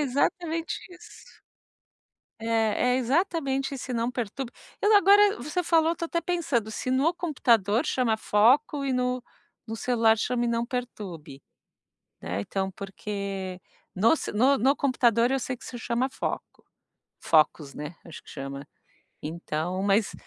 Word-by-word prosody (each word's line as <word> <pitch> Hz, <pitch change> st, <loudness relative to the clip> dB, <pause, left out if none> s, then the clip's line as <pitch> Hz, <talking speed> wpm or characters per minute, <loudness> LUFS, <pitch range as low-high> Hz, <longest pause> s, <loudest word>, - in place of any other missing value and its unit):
exatamente 320 Hz, +4 st, -1 dB
isso. 360 Hz, 0 st, -15 dB, 1.0 s
É 225 Hz, +2 st, +1 dB
é -, -, +2 dB
exatamente 275 Hz, 0 st, 0 dB
esse 255 Hz, -1 st, -5 dB
não 235 Hz, 0 st, 0 dB
perturbe. 245 Hz, +1 st, -4 dB, 0.3 s
Eu 415 Hz, 0 st, +5 dB
agora 405 Hz, +1 st, +6 dB
você 300 Hz, +8 st, -2 dB
falou, 325 Hz, -1 st, +3 dB
eu 335 Hz, -, -2 dB
tô 335 Hz, -, -3 dB
até 335 Hz, +1 st, -1 dB
pensando, 330 Hz, -12 st, -1 dB
se 235 Hz, +4 st, -4 dB
no 275 Hz, +6 st, +3 dB
computador 235 Hz, -, +2 dB
chama 240 Hz, -4 st, +1 dB
foco 260 Hz, +8 st, +3 dB
e 270 Hz, -, 0 dB
no 250 Hz, 0 st, 0 dB, 0.4 s
no 225 Hz, 0 st, -5 dB
celular 225 Hz, -1 st, +3 dB
chama 240 Hz, +2 st, 0 dB
não 235 Hz, 0 st, 0 dB
perturbe, 195 Hz, -, -6 dB, 0.8 s
né, 90 Hz, +3 st, -3 dB
então, 190 Hz, -, -2 dB
porque 195 Hz, -1 st, -5 dB, 0.3 s
no 225 Hz, -, +4 dB
ce -, -, -5 dB
no 260 Hz, +6 st, +4 dB
no 270 Hz, +5 st, +3 dB
computador, 240 Hz, -3 st, +2 dB
eu 270 Hz, -, +2 dB
sei 255 Hz, 0 st, -4 dB
que -, -, -15 dB
se 245 Hz, -, -7 dB
chama 235 Hz, +3 st, -1 dB
foco, -, -, -5 dB, 0.6 s
focus, 155 Hz, -2 st, +2 dB
né, 150 Hz, +3 st, -7 dB
acho 165 Hz, -, -10 dB
que -, -, -16 dB
chama 140 Hz, 0 st, -7 dB, 0.6 s
então, 170 Hz, +3 st, -3 dB
mas 200 Hz, +1 st, +2 dB
240 Hz, 145 wpm, -27 LUFS, 200-275 Hz, 1.0 s, agora